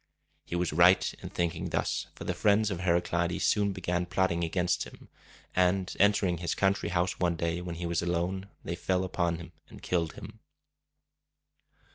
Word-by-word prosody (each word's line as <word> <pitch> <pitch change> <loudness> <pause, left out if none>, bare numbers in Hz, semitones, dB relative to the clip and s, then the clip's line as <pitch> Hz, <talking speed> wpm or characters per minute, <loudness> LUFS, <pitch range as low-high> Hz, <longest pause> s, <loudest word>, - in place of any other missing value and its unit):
He - - -5
was 85 -2 0
right 85 +3 +5
in - - -6
thinking 85 +1 -2
thus, - - -1
for - - -8
the - - -1
friends 105 +1 +3
of 90 - -3
Heraclides 85 -1 +1
soon 100 -1 +2
began 90 -2 -2
plotting 90 -2 +1
against 90 +1 0
him; - - -14 0.5
and, 90 +1 +2
entering 95 -4 +3
his 85 - -1
country 95 -3 +1
house 90 +1 0
one 85 -2 +1
day 85 +1 -1
when 90 -1 -5
he 85 +1 -4
was 85 -1 0
alone, 90 +3 -2
they 85 - -3
fell 95 +1 0
upon 85 -2 0
him 85 -1 -10 0.2
and - - -13
killed 85 -3 0
him. 110 +1 -10
90 Hz, 170 wpm, -29 LUFS, 85-95 Hz, 0.5 s, right